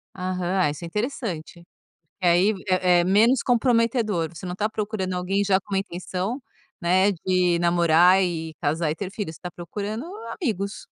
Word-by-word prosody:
Aham. 185 Hz, -2 st, 0 dB
Isso 150 Hz, +4 st, -7 dB
é -, -, -4 dB
interessante. 185 Hz, -, -4 dB, 0.6 s
E -, -, -1 dB
aí 180 Hz, +5 st, +4 dB
é 185 Hz, -1 st, +3 dB
é -, -, +3 dB
menos 220 Hz, +8 st, +4 dB
comprometedor, 230 Hz, -7 st, +1 dB
você 185 Hz, -, -8 dB
não 180 Hz, -, -4 dB
está 210 Hz, +4 st, -1 dB
procurando 205 Hz, -4 st, -3 dB
alguém 190 Hz, +3 st, 0 dB
já 190 Hz, -1 st, +3 dB
com 200 Hz, +1 st, -9 dB
uma 195 Hz, -, +2 dB
intenção, 190 Hz, +6 st, -4 dB, 0.4 s
né, 185 Hz, +3 st, +3 dB
de 180 Hz, -1 st, +1 dB
namorar 175 Hz, +2 st, +4 dB
e 165 Hz, -3 st, -2 dB
casar 155 Hz, +1 st, 0 dB
e -, -, -3 dB
ter 190 Hz, +2 st, -5 dB
filho, 200 Hz, -5 st, -4 dB
você 160 Hz, -, -13 dB
está 180 Hz, -, -6 dB
procurando 205 Hz, -, -5 dB, 0.4 s
amigos. 205 Hz, -, -3 dB
185 Hz, 170 wpm, -24 LUFS, 175-210 Hz, 0.6 s, aí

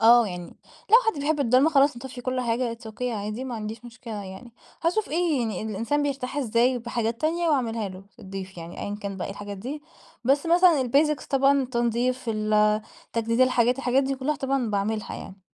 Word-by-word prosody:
آه 235 Hz, +1 st, +7 dB
يعني 180 Hz, -2 st, -6 dB, 0.4 s
لو 455 Hz, -, +10 dB
حد 320 Hz, -10 st, +1 dB
بيحب 295 Hz, +1 st, 0 dB
الضلمة، 260 Hz, +4 st, +4 dB
خلاص 280 Hz, -3 st, +4 dB
نطفِّي 250 Hz, 0 st, -8 dB
كل 255 Hz, +1 st, -1 dB
حاجة 235 Hz, 0 st, 0 dB
it's 230 Hz, -1 st, -11 dB
okay 220 Hz, -, -10 dB
عادي، 215 Hz, 0 st, -3 dB
ما 255 Hz, -2 st, -4 dB
عنديش 220 Hz, +2 st, -6 dB
مشكلة 230 Hz, -3 st, -7 dB
يعني. 190 Hz, +6 st, -10 dB, 0.3 s
هاشوف 360 Hz, +6 st, +1 dB
إيه 330 Hz, -2 st, +1 dB
يعني 220 Hz, -5 st, -2 dB
الإنسان 225 Hz, +7 st, -1 dB
بيرتاح 275 Hz, -1 st, -3 dB
إزاي 245 Hz, -1 st, +2 dB
بحاجات 235 Hz, -1 st, -2 dB
تانية، 335 Hz, +2 st, +1 dB
وأعملها 230 Hz, -7 st, 0 dB
له 185 Hz, 0 st, -10 dB, 0.2 s
الضيف 190 Hz, -1 st, -8 dB
يعني 165 Hz, +1 st, -8 dB
أيًا 205 Hz, -, -3 dB
كان 200 Hz, -1 st, -4 dB
بقي 180 Hz, -, -3 dB
إيه -, -, -5 dB
الحاجات 205 Hz, 0 st, -7 dB
دي، 280 Hz, +8 st, -6 dB, 0.4 s
بس 280 Hz, +5 st, +2 dB
مثلًا 345 Hz, -4 st, +5 dB
الbasics 300 Hz, 0 st, +3 dB
طبعًا 275 Hz, 0 st, +4 dB
التنضيف، 245 Hz, +1 st, 0 dB
ال 215 Hz, 0 st, +2 dB, 0.3 s
تجديد 230 Hz, +1 st, 0 dB
الحاجات، 250 Hz, 0 st, +3 dB
الحاجات 260 Hz, +1 st, +2 dB
دي 270 Hz, 0 st, -1 dB
كلها 275 Hz, +3 st, -1 dB
طبعًا 270 Hz, -4 st, -1 dB
باعملها 210 Hz, +1 st, -1 dB
يعني. 190 Hz, 0 st, -9 dB
240 Hz, 190 wpm, -25 LUFS, 215-275 Hz, 0.4 s, لو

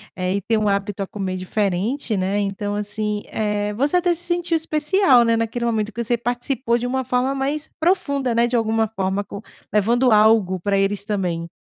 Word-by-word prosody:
eh, 185 Hz, +1 st, -1 dB
e 200 Hz, -, -1 dB
tem 225 Hz, +3 st, 0 dB
um 210 Hz, -1 st, +1 dB
hábito 200 Hz, 0 st, -1 dB
a -, -, -7 dB
comer 195 Hz, -4 st, -4 dB
diferente, 205 Hz, +6 st, -1 dB
né, 195 Hz, +2 st, 0 dB
então, 205 Hz, +1 st, -2 dB
assim, 210 Hz, 0 st, -3 dB
eh, 210 Hz, -1 st, -2 dB
você 280 Hz, +9 st, +1 dB
até 355 Hz, -1 st, +2 dB
se 345 Hz, -, -6 dB
sentiu 345 Hz, -1 st, 0 dB
especial, 310 Hz, -3 st, +3 dB
né, 230 Hz, 0 st, +3 dB
naquele 230 Hz, +1 st, -2 dB
momento 220 Hz, -2 st, -1 dB
que 235 Hz, +2 st, -4 dB
você 240 Hz, +1 st, +1 dB
participou, 245 Hz, +1 st, -1 dB
de 245 Hz, +1 st, -3 dB
uma 260 Hz, +1 st, -1 dB
forma 250 Hz, +3 st, 0 dB
mais 285 Hz, +3 st, -2 dB
profunda, 285 Hz, -8 st, +1 dB
né, 235 Hz, +1 st, +3 dB
de 245 Hz, -, -2 dB
alguma 225 Hz, -1 st, +1 dB
forma 195 Hz, -2 st, -2 dB
com 200 Hz, 0 st, -8 dB, 0.3 s
levando 235 Hz, +4 st, +3 dB
algo 210 Hz, -4 st, +4 dB
pra 200 Hz, +2 st, +1 dB
eles 195 Hz, 0 st, 0 dB
também. 180 Hz, -5 st, -2 dB
220 Hz, 195 wpm, -21 LUFS, 200-255 Hz, 0.3 s, algo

